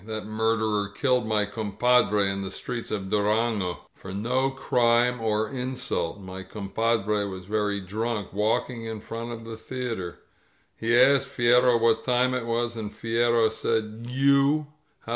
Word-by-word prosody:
'^That 110 0 -5
murderer 110 -1 0
killed 125 +2 +1
my 105 -1 +2
compadre 105 0 +2
in 95 0 -2
the 95 - -4
streets 115 +4 -5
of 95 -3 -4
Durango 105 -2 0
— - - -47
for 95 - -10
no 125 +7 0
crime 125 -2 +2
or 110 -1 +1
insult! 125 -7 -2
My 95 -1 -8
compadre 105 +1 -1
was 95 -2 -7
very 105 0 -1
drunk, 105 +1 -3
walking 110 +3 0
in 110 -1 -5
front 115 +2 -6
of 115 -1 -8
the 115 -1 -7
theater. 115 -7 -5 0.6
He 115 +1 +1
asked 135 +2 +5
Fierro 120 0 +4
what 115 -1 +2
time 125 0 +2
it 125 -2 -2
was, 120 0 -1
and 105 -2 -5
Fierro 115 0 +2
said. 110 +1 -2
You 140 +3 +3
115 Hz, 150 wpm, -26 LUFS, 105-120 Hz, 0.6 s, asked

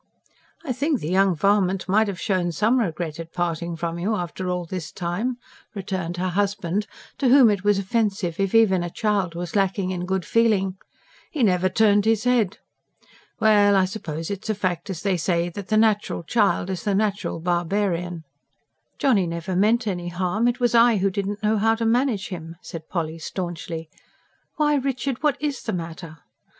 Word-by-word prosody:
"I 275 -6 -2
think 285 +2 0
the 155 - -4
young 190 -1 +3
varmint 195 +1 +1
might 215 +3 +3
have 195 -4 -4
shown 185 -3 0
some 215 +10 +2
regret 170 -6 -3
at 165 0 -7
parting 170 -1 -2
from 170 0 -4
you, 210 +5 0
after 180 0 -4
all 180 -1 -2
this 165 -3 -6
time," 200 +8 -2 0.4
returned 185 -3 -4
her 185 +1 -1
husband, 200 +1 -1 0.3
to 265 - +2
whom 255 -4 +7
it 200 -2 -2
was 205 -1 +3
offensive 195 -3 -1
if 195 +1 0
even 200 -5 +5
a 175 - -3
child 200 -3 -1
was 175 +1 -5
lacking 195 -1 +1
in 180 -1 -4
good 190 -1 -1
feeling. 210 -5 +2 0.5
"He 290 -6 -1
never 185 -3 +3
turned 205 +1 +3
his 225 -1 +2
head. 245 -6 +2 0.8
Well, 205 -2 +5
I 190 -1 +4
suppose 165 -4 -5
it's 200 +2 -5
a 215 - +1
fact, 180 -2 -2
as 180 -4 -5
they 195 -3 +1
say, 170 0 0
that 195 +2 -8
the 215 - +2
natural 215 -5 +2
child 200 -1 +1
is 185 - -4
the 205 -3 0
natural 205 -4 -1
barbarian." 175 0 -1 0.7
"Johnny 210 -10 +2
never 170 +2 -4
meant 220 +5 +3
any 175 -4 -3
harm. 180 +6 0
It 245 +1 0
was 240 -2 +2
I 235 -1 +5
who 195 +1 +1
didn't 200 +2 -3
know 215 0 +2
how 225 +2 +3
to 230 0 -2
manage 230 -3 +1
him," 165 -3 -7
said 165 -3 -9
Polly 165 -2 -3
staunchly. 165 -1 -5 0.7
"Why, 295 -1 +2
Richard, 270 -1 -2
what 295 -2 +2
IS 290 -3 -2
the 220 - -3
matter?" 165 -2 -6
195 Hz, 185 wpm, -23 LUFS, 175-220 Hz, 0.8 s, whom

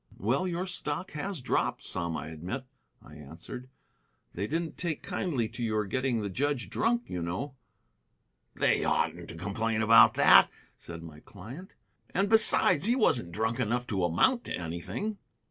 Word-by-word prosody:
"Well, 130 - 0
your 180 +1 -3
stock 175 -2 -4
has 160 +1 -5
dropped - - -1
some, 85 -1 -2
I - - -7
admit," 90 - -6 0.4
I 75 - -14
answered. 80 - -10 0.6
"They 100 +4 -3
didn't 165 +3 -3
take 165 -4 -4
kindly 135 - -2
to - - -9
your 110 -2 -1
getting 130 +2 -1
the 100 - -4
judge 140 +4 -2
drunk, 235 +1 0
you 90 - -5
know." 95 +12 -4 1.0
"They - - +1
oughtn't 85 +1 -1
to - - -8
complain 110 +5 -2
about 115 +1 +6
that," - - +7 0.3
said 85 -1 -10
my 80 -2 -11
client; 120 - -12 0.4
"and 195 +2 +1
besides, 210 -5 +6
he 240 - +3
wasn't 125 - +2
drunk 110 +5 -2
enough 125 +1 -1
to 100 -6 -2
amount 95 - +2
to - - -4
anything." 85 - -5
115 Hz, 160 wpm, -28 LUFS, -, 1.0 s, that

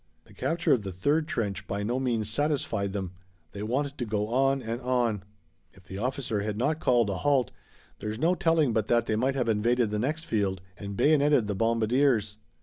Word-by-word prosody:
The - - -19
capture 170 +1 +1
of 125 - +2
the 100 -1 -5
third 145 - 0
trench 105 - -3
by 100 +1 -2
no 120 +5 -1
means 115 -5 -1
satisfied 125 -5 -1
them. 95 -3 -4 0.4
They 100 - -7
wanted 140 +6 -2
to 120 - -1
go 105 0 -1
on 135 +2 +2
and 115 +2 -4
on. 120 -5 0 0.5
If 95 -1 -19
the 95 +2 -8
officer 125 -3 -2
had 105 0 -3
not 150 +7 0
called 120 -7 +2
a 95 - -2
halt 130 +2 +2 0.5
there's 105 0 -4
no 165 +7 +2
telling 165 -8 +2
but 110 -1 0
that 120 -1 +2
they 110 - 0
might 130 +5 +1
have 125 -3 0
invaded 115 +1 +2
the 105 - -1
next 155 +7 -2
field 100 -3 0 0.2
and 100 0 -7
bayoneted 145 -5 +4
the 105 - -2
bombardiers. 115 0 +1
115 Hz, 200 wpm, -28 LUFS, 105-135 Hz, 0.5 s, bayoneted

